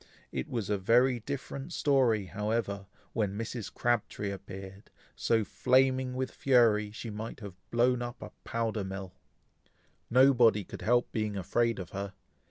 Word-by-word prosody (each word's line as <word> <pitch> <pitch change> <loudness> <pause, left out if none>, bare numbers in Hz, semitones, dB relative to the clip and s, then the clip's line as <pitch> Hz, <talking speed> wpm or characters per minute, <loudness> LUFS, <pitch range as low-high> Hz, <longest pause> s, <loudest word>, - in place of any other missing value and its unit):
It 65 -2 -3
was 115 -4 -2
a 100 - +1
very 120 +5 +4
different 140 +4 -5
story, 125 -8 +3
however, 100 0 -2 0.3
when 105 -3 -1
Mrs. 115 -2 -4
Crabtree 105 -4 -1
appeared, 95 0 -9 0.3
so 115 -2 +2
flaming 130 +2 +2
with 130 0 -2
fury, 115 -6 +3
she 110 +2 -7
might 110 +2 -6
have 100 -3 -7 0.2
blown 120 +1 +2
up 120 +1 -5
a - - -8
powder 115 -2 -1
mill. 95 -1 -6 1.0
Nobody 120 -4 +5
could - - -9
help 120 +2 +2
being 105 -2 -2
afraid 115 +5 +1
of 90 -3 -7
her. 100 0 -5
115 Hz, 145 wpm, -30 LUFS, 100-125 Hz, 1.0 s, Nobody